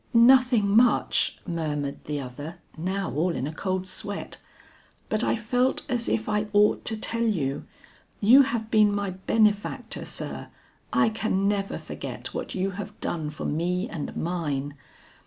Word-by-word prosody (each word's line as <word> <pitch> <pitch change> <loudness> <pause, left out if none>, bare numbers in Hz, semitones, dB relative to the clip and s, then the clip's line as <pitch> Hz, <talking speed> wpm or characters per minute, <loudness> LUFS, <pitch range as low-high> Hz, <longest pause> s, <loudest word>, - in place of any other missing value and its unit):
"Nothing 245 -2 +6
much," 240 +1 +3
murmured 150 -5 -3
the 150 -1 -2
other 145 +5 -7 0.2
now 190 +4 -2
all 165 +5 +1
in 130 0 -2
a 150 - -4
cold 185 +2 -2
sweat. 200 +2 -5 0.7
"But 215 +2 +2
I - - +2
felt 245 +4 +1
as 245 -4 -1
if 220 - 0
I 210 0 0
ought 210 0 +4
to 220 - 0
tell 230 +2 -2
you. 165 -12 0 0.5
You 240 +7 +8
have 235 -5 -1
been 215 -2 +5
my 205 -1 -1
benefactor, 205 +2 0
sir, - - -5 0.4
I - - +4
can 215 -3 0
never 200 -1 -1
forget - - -7
what - - -4
you 190 +1 0
have 205 +2 -7
done 155 -3 -2
for 150 - -7
me 180 +6 0
and 155 -9 -5
mine. 145 -5 -2
200 Hz, 155 wpm, -26 LUFS, 165-220 Hz, 0.7 s, You